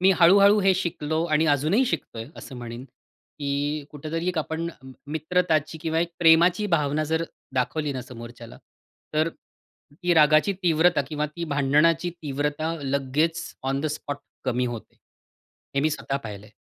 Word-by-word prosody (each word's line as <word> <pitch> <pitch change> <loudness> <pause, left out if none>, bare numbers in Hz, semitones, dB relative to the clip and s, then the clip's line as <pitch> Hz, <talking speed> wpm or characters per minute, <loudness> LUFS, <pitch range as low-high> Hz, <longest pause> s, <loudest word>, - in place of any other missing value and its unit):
मी 190 +1 +5
हळू-हळू 200 +4 +7
हे 195 -1 +4
शिकलो 160 -3 -1
आणि 155 -1 +2
अजूनही 155 - +3
शिकतोय 115 - -4
असं 130 - -9
म्हणेन, 120 +1 -7 0.5
की 145 +1 -2
कुठेतरी 160 +4 -4
एक 180 - -1
आपण 160 +2 -2 0.4
मित्रताची 160 -1 0
किंवा 160 -1 0
एक 170 0 -1
प्रेमाची 175 +4 +5
भावना 155 -4 +1
जर 160 +2 0 0.3
दाखवली 145 +4 0
ना 130 -2 -4
समोरच्याला, 120 -1 -11 0.6
तर 155 +2 +2
ती 170 +2 -6
रागाची 155 +4 +5
तीव्रता 165 -1 +3
किंवा 150 0 -1
ती 170 +3 -6
भांडणाची 150 +4 +2
तीव्रता 150 +3 -2
लगेच 140 +5 0 0.2
ऑन 135 +1 -1
द 155 - -1
स्पॉट 145 0 -6 0.3
कमी 125 -1 0
होते, 120 -2 -7 0.8
हे 140 - +2
मी 155 +2 +2
स्वतः 135 -2 -2
पाहिलंय. 105 -5 -8
155 Hz, 145 wpm, -25 LUFS, 140-165 Hz, 0.8 s, हळू-हळू